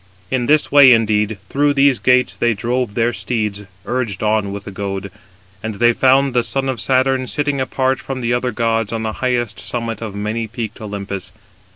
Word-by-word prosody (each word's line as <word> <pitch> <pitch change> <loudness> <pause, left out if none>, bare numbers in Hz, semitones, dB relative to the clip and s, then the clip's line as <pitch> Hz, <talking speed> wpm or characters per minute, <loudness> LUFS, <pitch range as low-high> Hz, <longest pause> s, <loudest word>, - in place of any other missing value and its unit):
In 125 -2 0
this 150 0 +3
way, 140 -3 +8
indeed, 110 -2 +1
through 145 +1 +1
these 135 -2 +4
gates, 125 0 +3
they 120 -1 +1
drove 120 -1 -2
their 120 +1 +1
steeds, 105 -5 -3 0.2
urged 120 -7 -2
on 105 -2 +1
with 100 0 -6
the 100 - -8
goad: 100 0 -5 0.5
and 110 -1 -4
they 120 +3 +4
found 135 +2 +3
the 120 - +3
son 135 +2 -1
of 125 -5 -2
Saturn 130 0 +1
sitting 145 -1 -1
apart 130 0 0
from 135 -1 -5
the 120 0 0
other 125 +1 0
gods 115 -1 0
on 115 -1 -3
the 110 -1 -2
highest 120 -4 -1
summit 115 -2 -4
of 110 -3 -6
many 110 +2 -3
peaked 110 -1 -6
Olympus. 100 -3 -6
120 Hz, 190 wpm, -18 LUFS, 105-130 Hz, 0.5 s, way